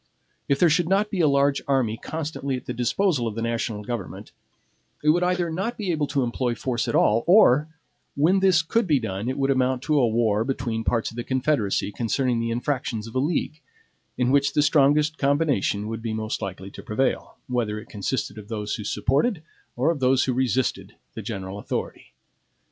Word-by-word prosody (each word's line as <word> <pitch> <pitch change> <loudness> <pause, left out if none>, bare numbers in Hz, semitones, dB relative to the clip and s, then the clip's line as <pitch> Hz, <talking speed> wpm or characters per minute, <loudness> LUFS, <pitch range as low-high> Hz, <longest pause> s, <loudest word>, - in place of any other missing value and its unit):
If 140 - +3
there 175 - +5
should 175 +1 +2
not 205 +2 +2
be 190 -4 0
a 155 - +4
large 140 0 +2
army 130 -6 +1
constantly 150 -1 -4
at 125 - -7
the 125 - -4
disposal 125 - +1
of 110 - -4
the 115 - -3
national 115 -2 -2
government 110 -4 -6 0.7
it 150 - +3
would 170 +3 +4
either 180 -1 0
not 195 +9 -3
be 200 -4 -2
able 150 -3 0
to 140 -1 0
employ 120 0 -1
force 120 -2 -2
at - - -1
all, 110 +2 +3
or, 155 - +6 0.5
when 170 +7 +3
this 185 -4 +4
could 225 +6 0
be 150 -4 +3
done, 110 0 -3
it 130 - -3
would 135 0 +1
amount 130 -1 +1
to 150 -2 +2
a 125 - +4
war 110 -2 +1
between 120 -3 -2
parts 115 0 0
of 115 - -13
the 120 - -2
Confederacy 130 -7 0
concerning 120 +3 0
the 115 0 -1
infractions 120 -2 -2
of 115 - -10
a 130 - 0
league, 155 +1 -1 0.6
in 125 0 +1
which 140 0 +3
the 150 - +3
strongest 150 +1 +3
combination 140 -8 +1
would 115 0 -5
be 115 -1 -3
most 110 0 -3
likely 95 -1 -6
to - - -10
prevail, 110 +6 -2
whether 120 -4 -1
it - - -12
consisted 105 0 -3
of 105 - -11
those 105 -2 -4
who 105 - -4
supported 145 - 0 0.3
or 135 +7 +2
of 160 - -4
those 130 0 +3
who 130 - 0
resisted 130 0 -1 0.2
the - - -6
general 95 +1 -6
authority. - - -5
130 Hz, 200 wpm, -24 LUFS, 115-150 Hz, 0.7 s, or